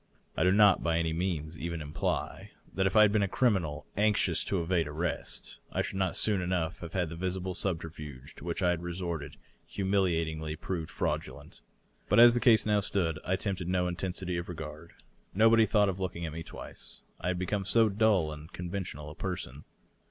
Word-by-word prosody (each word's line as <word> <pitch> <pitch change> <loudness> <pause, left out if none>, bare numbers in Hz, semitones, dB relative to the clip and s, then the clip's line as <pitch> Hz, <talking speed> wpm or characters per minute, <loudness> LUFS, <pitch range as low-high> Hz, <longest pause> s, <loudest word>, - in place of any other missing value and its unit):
I - - -1
do 90 - +5
not 105 0 +6
by 85 -1 +1
any 80 -1 0
means 80 -2 -2
even 85 0 -3
imply 75 -1 -3 0.2
that 95 0 +2
if 95 - -2
I 110 - +8
had 105 - +5
been 105 0 +2
a 100 - +2
criminal 95 - +1
anxious 105 0 +2
to 95 - 0
evade 85 -1 +1
arrest 80 +3 -4
I - - 0
should 95 - -4
not 95 -2 0
soon 105 -3 +2
enough 90 -2 -1
have 85 -1 -8
had 90 -4 0
the 85 - -6
visible 95 +1 -2
subterftige 80 -7 -5
to - - -11
which 85 +3 -3
I 90 - +4
had 85 -1 -2
resorted 85 -4 -4 0.3
humiliatingly 85 -6 0
proved 85 0 -4
fraudulent. 70 +4 -4 0.5
But - - +5
as 120 0 +9
the 120 - +1
case 115 -3 +5
now 105 -1 +3
stood, 85 -5 -1
I 90 - +1
tempted 95 -2 -3
no 90 0 +1
intensity 90 0 -2
of 85 +1 -5
regard. 80 0 -8 0.4
Nobody 115 +1 +6
thought 105 0 +4
of 95 -1 -2
looking 85 -2 -3
at 80 - -5
me 80 - -5
twice, - - -10 0.2
I - - -4
had 90 0 0
become 95 +3 -1
so 115 +2 +4
dull 100 -6 +2
and 75 +2 -11
conventional 85 -5 -5
a - - -8
person. 80 -6 -5
90 Hz, 195 wpm, -30 LUFS, 80-95 Hz, 0.5 s, as